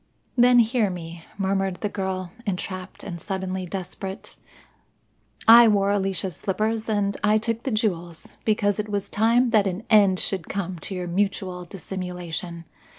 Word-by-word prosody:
"Then 245 0 +6
hear 230 -2 +3
me," 170 -2 -8
murmured 195 -1 0
the 210 - 0
girl, 190 -3 -3 0.2
entrapped 185 0 -4
and 170 -4 -6
suddenly 190 0 -3
desperate. 190 +1 -6 1.1
"I 230 +1 +10
wore 200 -2 +3
Alicia's 190 -3 -1
slippers 215 +3 -1
and 200 -2 +1
I 210 +1 +4
took 230 +1 -2
the 270 - -3
jewels, 175 -7 -2
because 205 -2 +1
it 210 0 -3
was 200 -1 -2
time 230 +3 +3
that 210 -3 +4
an 190 +3 -3
end 200 -4 +5
should 190 -5 -2
come 185 -3 -3
to 190 - -6
your 180 -1 -3
mutual 185 0 -2
dissimulation. 180 -2 -6
195 Hz, 150 wpm, -24 LUFS, 180-215 Hz, 1.1 s, I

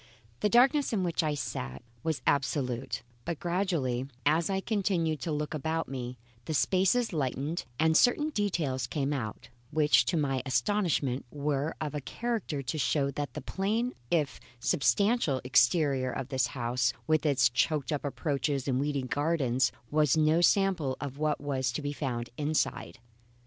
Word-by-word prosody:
The 210 - +2
darkness 270 +4 +4
in 195 -4 +1
which 170 -2 0
I 155 -2 0
sat 65 - -5 0.2
was 160 -2 -2
absolute; 135 -4 0 0.2
but 170 +1 -4
gradually, 170 -9 -1 0.2
as 160 +5 +3
I 190 -1 +1
continued 190 -7 0
to 165 - -3
look 150 0 -2
about 160 +2 -2
me, 125 -2 -5 0.3
the 155 - -2
spaces 190 +8 +2
lightened 145 +2 -2
and 160 0 +3
certain 295 - +4
details 170 - -1
came 145 -1 -1
out, 110 -7 -5 0.2
which 150 0 +4
to 170 - 0
my 135 -4 0
astonishment 140 -4 0
were 145 +1 -1
of 155 -2 -3
a 150 - -3
character 210 - -3
to 135 +5 -3
show 140 -1 +1
that 140 -3 -4
the 150 - -4
plain 215 - -1 0.2
if 150 -5 0 0.2
substantial 180 - +2
exterior 130 +1 +3
of 135 0 -5
this 130 -2 +1
house 120 -1 0
with 155 -2 +2
its 140 -5 +4
choked 135 +3 0
up 150 - -1
approaches 140 -1 -1
and 130 -1 +1
weedy 140 -1 -1
gardens 135 -2 +1 0.2
was 150 -1 +3
no 155 +2 +4
sample 175 -7 +2
of 140 -1 -6
what 155 -1 +1
was 135 -3 -1
to 155 - -3
be 145 0 -2
found 120 -5 -3
inside. 150 -2 -1
150 Hz, 160 wpm, -29 LUFS, 135-170 Hz, 0.3 s, darkness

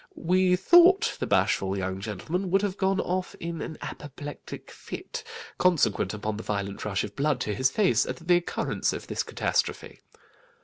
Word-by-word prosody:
We 180 +1 +3
thought 350 - +6
the - - -2
bashful 95 0 +1
young 95 0 -3
gentleman 155 - -3
would 195 +2 +2
have 200 -2 -1
gone 195 -1 +1
off 185 +1 -2
in 170 -1 -4
an 160 - -6
apoplectic 145 0 -8
fit, 485 -2 -7 0.4
consequent 130 - +2
upon 105 0 -3
the - - -5
violent 100 -1 -3
rush 100 -2 -1
of 100 - -7
blood 145 -2 +1
to 105 - -1
his 130 +6 +2
face 140 - +2
at - - -3
the 175 +1 +3
occurrence 175 - -1
of - - -6
this - - -2
catastrophe. - - -2
155 Hz, 170 wpm, -27 LUFS, -, 0.4 s, thought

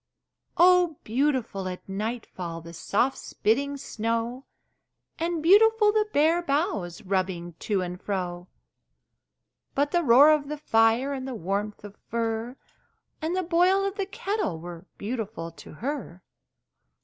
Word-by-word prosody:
Oh, 355 -3 +5
beautiful 240 -6 0
at 180 0 -7
nightfall 195 -4 -4
The 170 +1 -11
soft 225 +10 0
spitting 280 +6 0
snow! 230 +2 -3 0.7
And 335 -1 -1
beautiful 425 +4 +6
the 425 0 +1
bare 320 +3 +3
boughs 280 - -1
Rubbing 185 -3 -2
to 200 -4 0
and 180 0 -6
fro! 180 -3 -3 1.3
But 285 +1 +1
the 350 - +3
roaring 290 +3 +7
of 285 - -14
the 300 - -3
fire, 230 0 +3
And 265 -1 -5
the 260 - -4
warmth 200 +2 -3
of 205 -1 -10
fur, 230 +1 -2 0.7
And 325 +3 -1
the 370 - 0
boiling 360 +3 +3
of 395 0 -2
the 395 -2 -2
kettle 395 - -2
Were 175 +2 -9
beautiful 215 -6 -4
to 165 - -13
her! 225 - -5
240 Hz, 135 wpm, -26 LUFS, 195-320 Hz, 1.3 s, roaring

